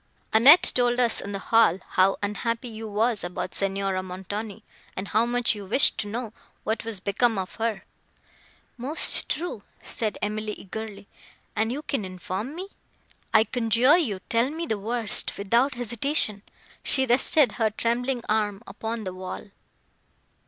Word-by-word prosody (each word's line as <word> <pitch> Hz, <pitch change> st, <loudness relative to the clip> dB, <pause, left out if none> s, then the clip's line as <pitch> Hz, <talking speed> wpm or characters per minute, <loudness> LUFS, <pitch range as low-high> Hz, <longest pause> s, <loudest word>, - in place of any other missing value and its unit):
"Annette 270 Hz, +10 st, +8 dB
told 245 Hz, 0 st, +2 dB
us 240 Hz, -2 st, +4 dB
in 200 Hz, -, -6 dB
the 200 Hz, -, -2 dB
hall 225 Hz, -3 st, +4 dB
how 190 Hz, +1 st, +3 dB
unhappy 230 Hz, +4 st, -2 dB
you 220 Hz, 0 st, -7 dB
were 220 Hz, +3 st, +1 dB
about 175 Hz, 0 st, -4 dB
Signora 195 Hz, -1 st, -1 dB
Montoni, 200 Hz, +4 st, -6 dB, 0.3 s
and 190 Hz, +2 st, -4 dB
how 225 Hz, +3 st, +2 dB
much 245 Hz, 0 st, +2 dB
you 205 Hz, -2 st, -7 dB
wished 215 Hz, +8 st, +3 dB
to 210 Hz, -, -1 dB
know 225 Hz, +1 st, -5 dB, 0.3 s
what 220 Hz, +1 st, -2 dB
was 225 Hz, -4 st, -4 dB
become 215 Hz, +3 st, +1 dB
of 185 Hz, -1 st, -3 dB
her." 220 Hz, -4 st, -1 dB, 1.0 s
"Most 280 Hz, +7 st, 0 dB
true," 330 Hz, -10 st, -3 dB, 0.2 s
said 220 Hz, -2 st, -3 dB
Emily 215 Hz, 0 st, -3 dB
eagerly, 205 Hz, 0 st, -8 dB, 0.5 s
"and 220 Hz, +2 st, +1 dB
you 290 Hz, +4 st, -4 dB
can 275 Hz, -8 st, -2 dB
inform 185 Hz, -, -5 dB
me. 375 Hz, +3 st, -6 dB, 0.6 s
I 220 Hz, -, +6 dB
conjure 240 Hz, +4 st, +3 dB
you 210 Hz, -, -2 dB
tell 235 Hz, +3 st, +2 dB
me 325 Hz, +3 st, -3 dB
the 220 Hz, -9 st, -2 dB
worst, 225 Hz, 0 st, +1 dB
without 235 Hz, +7 st, +2 dB
hesitation." 235 Hz, -2 st, -1 dB, 0.4 s
She 265 Hz, -1 st, +2 dB
rested 260 Hz, +1 st, +4 dB
her 225 Hz, -1 st, +1 dB
trembling 240 Hz, +3 st, -1 dB
arm 210 Hz, -1 st, 0 dB
upon 220 Hz, +3 st, -5 dB
the 185 Hz, -2 st, -5 dB
wall. 185 Hz, +2 st, -7 dB
220 Hz, 150 wpm, -26 LUFS, 200-245 Hz, 1.0 s, Annette